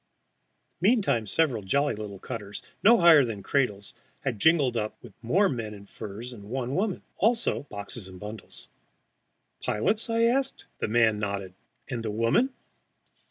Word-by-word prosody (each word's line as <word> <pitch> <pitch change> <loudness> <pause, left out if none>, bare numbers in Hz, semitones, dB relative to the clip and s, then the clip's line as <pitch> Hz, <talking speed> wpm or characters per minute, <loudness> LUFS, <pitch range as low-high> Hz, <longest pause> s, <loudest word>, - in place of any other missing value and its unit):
Meantime 195 - +2
several 130 -2 +1
jolly 140 +9 +1
little 105 -2 -6
cutters, 105 0 -7 0.2
no 230 +3 +8
higher 165 -4 +8
than 110 -5 -4
cradles, 105 -8 0 0.3
had 105 - -2
jingled 145 -3 +4
up 110 -2 -2
with 120 -5 -12
more 180 - +3
men 115 - -4
in 100 0 -12
furs 110 +4 -8
and 105 -4 -11
one 130 +1 -2
woman. 195 +3 -1
Also 225 - +2
boxes 100 0 -5
and 95 -1 -11
bundles. 105 +1 -8 0.9
"Pilots?" 210 - 0
I 230 0 +2
asked. 260 +3 +1
The - - -1
man 110 -1 +3
nodded. 100 -3 -3 0.3
"And 125 -4 -3
the 115 - -3
woman?" 115 - +2
115 Hz, 150 wpm, -27 LUFS, 105-165 Hz, 0.9 s, no